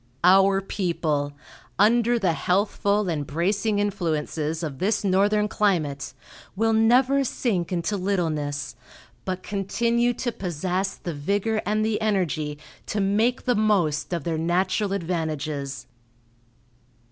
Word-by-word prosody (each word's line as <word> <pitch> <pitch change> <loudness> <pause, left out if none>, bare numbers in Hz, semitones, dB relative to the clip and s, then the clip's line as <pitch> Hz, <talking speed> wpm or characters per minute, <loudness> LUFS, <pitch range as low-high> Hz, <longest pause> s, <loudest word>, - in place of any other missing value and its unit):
Our 195 +2 +5
people, 160 -7 -1 0.4
under 235 +3 +4
the 190 -7 +1
healthful 200 +3 +1
and 150 -5 -2
bracing 200 +7 0
influences 165 -5 -1
of 140 -4 -5
this 210 +4 +1
northern 205 +2 +2
climate, 165 -10 -1 0.4
will 225 +3 +2
never 250 +5 +4
sink 200 -9 -1
into 180 +3 -1
littleness, 155 -8 -2 0.5
but 185 -1 -3
continue 235 +4 0
to 240 - -2
possess 185 0 -2
the 170 - -6
vigor 205 +9 -1
and 215 +1 +1
the 220 -1 -1
energy 165 -8 0 0.3
to 210 - -2
make 215 +6 +1
the 250 - +3
most 185 -10 +1
of 170 -2 -2
their 165 -2 -2
natural 185 +4 0
advantages." 155 -7 -3
190 Hz, 120 wpm, -24 LUFS, 160-210 Hz, 0.5 s, Our